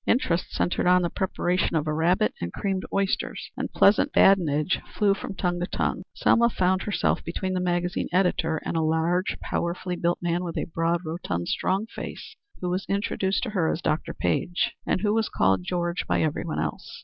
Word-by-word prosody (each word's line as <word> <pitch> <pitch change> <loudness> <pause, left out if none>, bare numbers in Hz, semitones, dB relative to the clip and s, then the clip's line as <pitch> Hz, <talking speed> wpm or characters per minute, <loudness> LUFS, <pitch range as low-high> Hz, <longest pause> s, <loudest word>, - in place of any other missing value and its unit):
Interest 180 -8 +1
centred 180 - 0
on 180 0 +5
the 170 - -1
preparation 180 -2 0
of 155 -1 +1
a 155 - -1
rabbit 175 +7 +2
and 85 - -3
creamed 195 -2 -2
oysters, 195 -1 -1
and - - -4
pleasant 200 +1 +4
badinage 170 -4 +4
flew 205 -2 +3
from 195 - -6
tongue 175 -2 -1
to 175 - -2
tongue. - - -1
Selma 235 0 +4
found 185 -3 +1
herself 205 - 0
between 185 +3 -3
the 185 - 0
magazine 175 0 -1
editor 175 -3 +1
and - - -2
a 165 - +2
large, 160 +3 +1
powerfully 180 +1 -2
built 175 0 0
man 175 +1 -1
with 170 -2 -4
a - - -1
broad, 165 +1 0
rotund, 155 - -3
strong 195 +3 0
face, 225 - -8 0.3
who 180 - -1
was 185 +1 -2
introduced 200 -1 0
to 240 - -3
her 180 -6 +1
as - - -2
Dr. 155 -2 -1
Page, 90 - 0 0.2
and - - +1
who 210 0 +2
was 225 0 +1
called 95 -1 +2
George 175 - -2
by - - +2
every 155 +2 -1
one 165 - -3
else. 75 -1 -4
175 Hz, 195 wpm, -26 LUFS, 165-190 Hz, 0.3 s, on